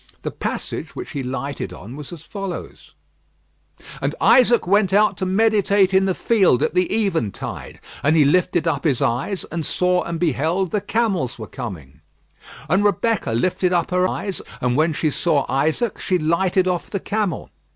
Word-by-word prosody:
The - - -3
passage - - -5
which - - -7
he 145 - -4
had 130 - -4
lighted 135 -3 -4
on 100 +8 -10
was 145 -1 -9
as 165 -3 -10
follows: 195 0 -7 1.1
"And - - -1
Isaac 240 -2 +5
went 195 0 +2
out 210 0 +4
to 185 - -2
meditate 200 -1 +3
in 190 0 +4
the 190 -2 0
field 195 - +3
at - - 0
the 180 0 +1 0.2
eventide, 160 - -4 0.2
and 150 +3 +3
he 150 -3 +5
lifted 175 +2 +2
up 165 - 0
his 140 -4 +1
eyes 135 - -1
and 165 -1 -3
saw 180 +3 +1
and 170 -1 -4
beheld 170 +3 0
the 210 - 0
camels 200 - -1
were 110 - -6
coming. 90 - -8 0.7
"And 195 +2 +2
Rebekah 205 - +1
lifted 185 +8 +1
up 175 0 0
her 180 0 +2
eyes, 195 -2 -3 0.2
and 125 -1 0
when 155 +3 +2
she 155 0 0
saw 150 -2 +1
Isaac 160 - 0
she 185 - +1
lighted 180 +3 +1
off 180 -2 -2
the 200 - -2
camel. 205 -2 -2
180 Hz, 175 wpm, -21 LUFS, 145-195 Hz, 1.1 s, Isaac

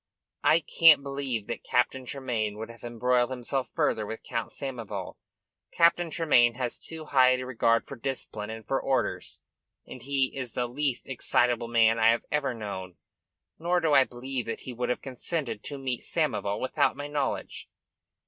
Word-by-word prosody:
"I 165 +2 +5
can't 155 -2 +6
believe 135 -6 -3
that 120 - -5
Captain 130 +1 0
Tremayne 115 -6 -2
would 110 +1 -6
have 115 -2 -16
embroiled 120 +1 +1
himself 130 0 -2
further 110 - 0
with 110 +2 -6
Count 115 -2 -3
Samoval. 125 -6 -6 0.5
Captain 170 0 +3
Tremayne 125 -8 +4
has 125 -1 -2
too 160 -1 -10
high 130 -3 +5
a 130 - -5
regard 115 -2 +2
for 140 - -8
discipline 115 -5 -4
and 110 -1 -7
for 135 - 0
orders, 135 -1 -1 0.4
and - - -10
he 135 -1 0
is 130 -3 -5
the 125 - 0
least 130 +1 -2
excitable 120 -2 +1
man 115 -1 +4
I 110 - +5
have 115 0 +2
ever 145 -4 0
known. 95 -5 -6 0.6
Nor 175 +2 +1
do 160 -3 +1
I 135 -2 +8
believe 125 0 -5
that 115 - -4
he 130 - -7
would 125 +1 -2
have 125 - -2
consented 130 -3 -3
to 145 - -5
meet 130 -3 -3
Samoval 100 0 -1
without 130 - +1
my 145 - -5
knowledge." 145 -2 -3
125 Hz, 170 wpm, -28 LUFS, 115-140 Hz, 0.6 s, I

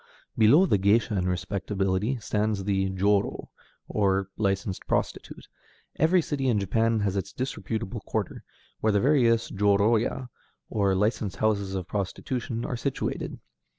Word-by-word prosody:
Below 115 - +6
the 105 - +2
géisha 105 +3 +3
in 90 -1 0
respectability 95 +5 -1
stands 105 -2 -1
the 95 -1 0
jōrō, 100 +2 0 0.4
or 95 -2 +1
licensed 95 -2 -2
prostitute. - - -3 0.5
Every 165 +3 +3
city 140 -3 -2
in 115 -5 +2
Japan 110 +3 +1
has 100 -1 0
its 100 0 -3
disreputable 110 -4 -4
quarter, - - -3 0.4
where 110 - +2
the 100 - +3
various 120 -4 +3
jōrōya, 105 +5 +2 0.4
or 100 -2 +2
licensed 105 0 0
houses 100 -2 0
of 95 -3 -4
prostitution, 115 +4 -3
are - - -3
situated. 135 +3 -3
105 Hz, 130 wpm, -27 LUFS, 95-115 Hz, 0.5 s, Below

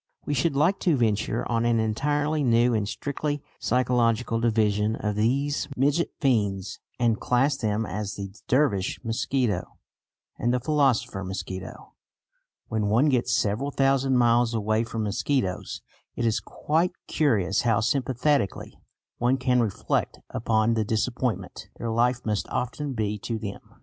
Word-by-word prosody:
We 145 - -1
should 140 +2 +1
like 165 +8 +2
to 165 -6 +2
venture 110 -1 0
on 115 -1 0
an 120 -1 +2
entirely 145 +7 0
new 120 -1 +3
and 105 -2 0
strictly 145 +2 -3 0.2
psychological 120 -1 +1
division 110 -2 +1
of 105 -2 -2
these 135 +7 0
midget 145 +6 +2
fiends, 100 -8 0 0.2
and 120 -2 +1
class 135 +3 +2
them 110 -1 -1
as 100 +2 -4
"the 100 -1 -6
Dervish 125 -8 +1
mosquito" 120 -3 -1 0.6
and 120 - +1
"the 125 - +1
philosopher 125 -7 +1
mosquito." 95 0 -7 0.7
When 110 -2 -1
one 120 +9 +3
gets 125 -3 +1
several 110 +7 +1
thousand 135 -1 +2
miles 120 -1 +3
away 110 +1 +1
from 115 -1 -3
mosquitoes, 100 -1 -2 0.3
it 120 - -1
is 110 -2 +2
quite 165 +4 -1
curious 105 - +1
how 115 -4 +2
sympathetically 130 -1 0 0.4
one 125 +2 +2
can 125 -1 +2
reflect 105 -5 -1
upon 110 0 +1
the 110 -1 +1
disappointment 115 +3 -2
their 115 - -3
life 120 +2 +1
must 105 -2 -1
often 135 +3 -3
be 105 -3 -2
to 115 +3 -3
them. 105 -2 -6
120 Hz, 140 wpm, -26 LUFS, 105-135 Hz, 0.7 s, new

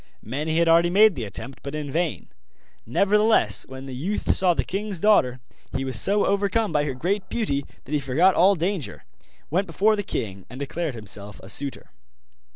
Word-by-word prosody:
Many 150 +8 -2
had 170 0 +3
already 170 +1 +5
made 210 +3 +6
the 125 -8 -5
attempt, 115 +7 -7
but 140 +2 -6
in 150 -2 -4
vain; 170 +1 -2 0.6
nevertheless 210 - +2
when 130 0 -9
the 135 - -7
youth 175 +12 -1
saw 180 -2 +2
the - - 0
king's 200 -1 -3
daughter 130 -11 +3 0.4
he 135 - -3
was 130 -4 +5
so 200 +1 +3
overcome 200 +2 +1
by 150 0 +1
her 140 -3 -3
great 190 +8 -2
beauty 140 -12 -2 0.2
that 135 - -12
he 150 - +1
forgot 145 +8 +3
all 190 +4 +5
danger, 175 -2 -3 0.5
went 190 +5 +1
before 215 +2 +2
the 205 - -2
king, 100 - -5
and 125 +3 -9
declared 150 0 -3
himself 105 -2 -8
a 95 - -10
suitor. 140 - -1
160 Hz, 185 wpm, -24 LUFS, 130-195 Hz, 0.6 s, made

